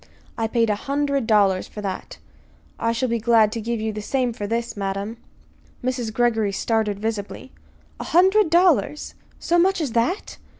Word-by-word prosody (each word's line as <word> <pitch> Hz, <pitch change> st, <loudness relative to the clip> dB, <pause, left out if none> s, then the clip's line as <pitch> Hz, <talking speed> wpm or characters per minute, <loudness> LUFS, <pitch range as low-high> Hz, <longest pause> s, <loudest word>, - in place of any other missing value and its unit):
"I 225 Hz, -, -1 dB
paid 230 Hz, -1 st, +1 dB
a -, -, +1 dB
hundred 280 Hz, -3 st, 0 dB
dollars 200 Hz, -4 st, +3 dB
for -, -, -10 dB
that. 195 Hz, -2 st, -5 dB, 0.6 s
I 230 Hz, -, +1 dB
shall 235 Hz, +3 st, -1 dB
be 235 Hz, -1 st, -1 dB
glad 225 Hz, -1 st, +4 dB
to 230 Hz, -, -4 dB
give 235 Hz, +1 st, -2 dB
you 220 Hz, 0 st, -2 dB
the 210 Hz, -, -5 dB
same 250 Hz, +2 st, -1 dB
for 205 Hz, -2 st, -5 dB
this, 230 Hz, +1 st, -2 dB
madam." 200 Hz, +2 st, -4 dB, 0.7 s
Mrs. 250 Hz, -3 st, -2 dB
Greggory 225 Hz, -3 st, +1 dB
started 215 Hz, -1 st, 0 dB
visibly. 220 Hz, +3 st, -4 dB, 0.5 s
"A -, -, -5 dB
hundred 380 Hz, +2 st, +4 dB
dollars? 340 Hz, -3 st, +2 dB, 0.3 s
So 345 Hz, +1 st, +1 dB
much 380 Hz, +2 st, +3 dB
as 295 Hz, -7 st, -2 dB
that?" 240 Hz, -, -1 dB
230 Hz, 170 wpm, -22 LUFS, 215-270 Hz, 0.7 s, glad